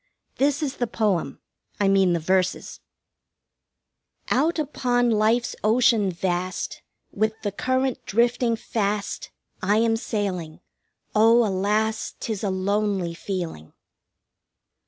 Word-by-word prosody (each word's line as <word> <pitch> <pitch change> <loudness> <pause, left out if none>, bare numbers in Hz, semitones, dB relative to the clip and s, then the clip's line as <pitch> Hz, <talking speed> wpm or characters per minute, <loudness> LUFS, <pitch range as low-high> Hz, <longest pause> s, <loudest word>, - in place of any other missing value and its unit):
This 285 +3 +1
is 280 -2 -3
the 245 - 0
poem 210 -6 -1 0.4
I 200 - +3
mean 195 -2 +4
the 170 - +1
verses: 185 +2 0 1.5
1 250 - +3
Out 325 +5 +1
upon 245 -5 +1
life's 225 +3 +2
ocean 225 -2 +3
vast, 180 +1 -3 0.3
With 220 +2 -1
the 205 - -1
current 260 +4 -1
drifting 235 +2 +2
fast, 205 -2 -2 0.3
I 205 +3 +2
am 225 0 +3
sailing. 185 -8 -3 0.5
Oh, 225 +2 +5
alas, 210 +3 0
'Tis 220 -3 -4
a 200 - +1
lonely 190 -2 0
feeling! 170 - -5
215 Hz, 115 wpm, -24 LUFS, 190-235 Hz, 1.5 s, Oh